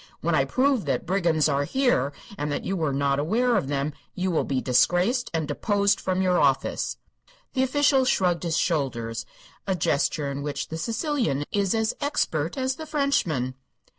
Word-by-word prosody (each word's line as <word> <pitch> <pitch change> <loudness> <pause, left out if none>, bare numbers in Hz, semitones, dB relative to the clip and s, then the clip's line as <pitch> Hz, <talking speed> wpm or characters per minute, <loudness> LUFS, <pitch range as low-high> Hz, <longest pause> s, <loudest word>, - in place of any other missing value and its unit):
When - - 0
I - - +3
prove 260 -4 +1
that - - -1
brigands 170 -4 +2
are 140 -1 +1
here 245 - +1 0.2
and 150 -5 -3
that - - -2
you 195 - -1
were 160 -5 0
not 140 0 +1
aware 235 +11 +2
of 195 - 0
them, 140 +1 -1 0.2
you 185 0 -1
will 165 - +1
be 135 -2 -1
disgraced 180 - +2
and 160 -3 -1
deposed 200 +6 +1
from 185 0 0
your 180 -1 +3
office." 135 -2 +1 0.6
The 260 - +1
official 270 0 +3
shrugged 180 -8 +2
his 165 -3 -1
shoulders, 120 -8 -1 0.4
a 190 - +1
gesture 145 -2 0
in 140 +1 -4
which 145 0 -4
the 160 - -4
Sicilian 230 - -1
is 200 -1 +1
as 220 0 +1
expert 165 - -1
as 260 0 -1
the 315 - -7
Frenchman. 230 - 0
175 Hz, 175 wpm, -25 LUFS, 145-235 Hz, 0.6 s, I